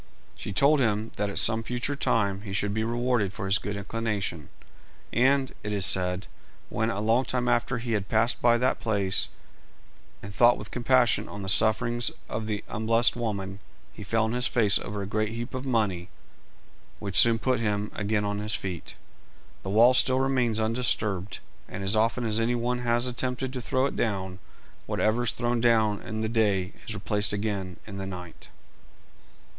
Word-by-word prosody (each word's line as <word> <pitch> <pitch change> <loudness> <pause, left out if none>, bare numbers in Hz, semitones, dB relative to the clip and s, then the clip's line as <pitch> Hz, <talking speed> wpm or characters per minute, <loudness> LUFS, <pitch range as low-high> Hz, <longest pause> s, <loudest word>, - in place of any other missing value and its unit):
She - - -8
also 100 - -6
told 145 +2 +5
him 110 -3 0
that 105 0 -1
at 100 - -4
some 110 0 +3
future 125 +5 -3
time 100 -7 0
he 100 -2 -7
should 100 0 0
be 110 +1 -1
rewarded 120 -3 0
for 105 - -5
his 95 +3 +2
good 100 0 -4
inclination; 100 -6 -3 0.6
and, 135 +2 +3
it 105 - -4
is 100 -2 0
said, 90 +1 +1 0.4
when 110 +1 -1
a 105 - -2
long 115 +4 +2
time 125 -1 -1
after 120 +1 +1
he 115 -3 -1
passed 110 +4 +1
by 120 -1 +4
that 125 +2 0
place, 100 -4 -1 0.9
and 100 0 -8
thought 120 +4 +5
with - - -9
compassion 125 0 +2
on 100 -1 -7
the 95 - -3
sufferings 115 +4 +3 0.2
of 110 0 -4
the 105 -2 -3
unblest 115 +2 +2
woman, 100 -5 -4 0.3
he - - -11
fell 110 +3 0
on 110 +1 -1
his 125 0 +4
face 105 -4 +3
over 105 0 -5
a - - -4
great 110 +2 -1
heap 120 +4 -6
of 130 +1 -4
money, 100 -8 0 0.9
which 100 -2 -6
soon 115 -1 +6
put 125 +1 0
him 105 -2 -1
again 105 0 -1
on 100 0 -2
his 105 +1 +2
feet. 90 -4 -6 0.7
The 95 - -6
wall 115 +5 +6
still 130 0 +4
remains 130 -4 +1
undisturbed, 110 -4 -1 0.3
and 95 +1 -6
as 95 +3 +2
often 115 +3 +1
as 110 0 +1
any 115 +2 +1
one 120 +1 -1
has 120 0 +1
attempted 125 +1 -2
to 125 - -4
throw 130 +3 0
it - - -3
down, 95 -4 -2 0.5
whatever 115 +3 +1
is - - +2
thrown 120 -1 -1
down 110 -3 +3
in 110 0 -5
the 110 - -1
day 105 -4 +1
is 110 - -3
replaced 105 +1 0
again 100 -4 -3
in 100 -2 -8
the 95 - -4
night. 90 -3 -9
110 Hz, 185 wpm, -27 LUFS, 100-120 Hz, 0.9 s, soon